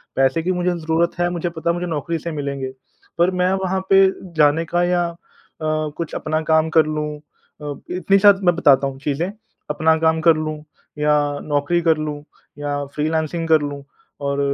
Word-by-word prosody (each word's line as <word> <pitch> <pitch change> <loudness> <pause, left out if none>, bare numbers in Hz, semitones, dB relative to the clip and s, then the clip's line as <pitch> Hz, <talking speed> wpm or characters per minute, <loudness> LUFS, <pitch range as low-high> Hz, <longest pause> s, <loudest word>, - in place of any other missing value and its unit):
पैसे 135 +5 +2
की 185 - 0
मुझे 180 0 0
ज़रूरत 165 0 0
है 175 0 +2
मुझे 175 0 -2
पता 165 0 -3
है 170 - +3
मुझे 175 0 -3
नौकरी 165 +1 -2
से 170 +2 -5
मिलेंगे, 140 -3 -4 0.5
पर 175 +2 +3
मैं 180 0 +1
वहाँ 190 0 0
पे 195 0 +7 0.3
जाने 150 +2 +4
का 175 0 +3
या 175 -1 +1
अ, 170 - -12 0.5
कुछ 155 +1 -2
अपना 155 0 -1
काम 160 0 +3
कर 155 - +6
लूँ 150 -1 -3 0.4
अ, 145 -1 -4 0.2
इतनी 185 +2 +2
साथ 200 0 +6
मैं 175 -2 +4
बताता 140 -5 +4
हूँ 135 0 -7
चीज़ें, 150 +7 -2 0.4
अपना 160 +2 +2
काम 160 0 +2
कर 165 0 +5
लूँ 155 0 -3 0.4
या 150 0 +3 0.3
नौकरी 150 +4 0
कर 160 -2 +3
लूँ 150 -1 -4 0.4
या 145 -1 -2
फ्रीलांसिंग 160 +2 -1
कर 160 -2 +4
लूँ 145 -1 -5 0.4
और 140 0 -1
160 Hz, 185 wpm, -20 LUFS, 150-175 Hz, 0.5 s, पे